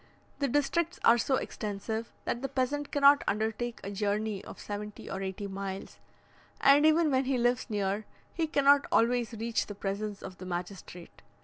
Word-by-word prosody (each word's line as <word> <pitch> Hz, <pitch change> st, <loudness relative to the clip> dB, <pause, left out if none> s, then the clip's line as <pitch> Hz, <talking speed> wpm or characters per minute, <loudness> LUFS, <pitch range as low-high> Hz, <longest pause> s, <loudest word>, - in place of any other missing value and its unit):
The 280 Hz, -, +1 dB
districts 305 Hz, +6 st, 0 dB
are 235 Hz, +1 st, +6 dB
so 265 Hz, +3 st, +2 dB
extensive, 220 Hz, 0 st, -4 dB
that 240 Hz, -, -2 dB
the 270 Hz, -, -3 dB
peasant 275 Hz, +2 st, -1 dB
cannot 285 Hz, 0 st, +6 dB
undertake 220 Hz, +3 st, -1 dB
a 200 Hz, -, -5 dB
journey 205 Hz, 0 st, -1 dB
of -, -, -10 dB
seventy 210 Hz, 0 st, -6 dB
or 195 Hz, -, -4 dB
eighty 190 Hz, +1 st, -4 dB
miles; 195 Hz, 0 st, -6 dB, 0.6 s
and 285 Hz, +2 st, +6 dB
even 315 Hz, 0 st, +4 dB
when 260 Hz, 0 st, +2 dB
he 265 Hz, 0 st, +1 dB
lives 245 Hz, +1 st, +1 dB
near, 205 Hz, 0 st, -1 dB, 0.3 s
he 330 Hz, -2 st, -1 dB
cannot 285 Hz, -1 st, +4 dB
always 240 Hz, 0 st, +2 dB
reach 225 Hz, +1 st, -1 dB
the 205 Hz, -, -7 dB
presence 200 Hz, +1 st, -4 dB
of 185 Hz, -, -9 dB
the 185 Hz, -, -8 dB
magistrate. 175 Hz, -, -7 dB
225 Hz, 170 wpm, -30 LUFS, 200-275 Hz, 0.6 s, are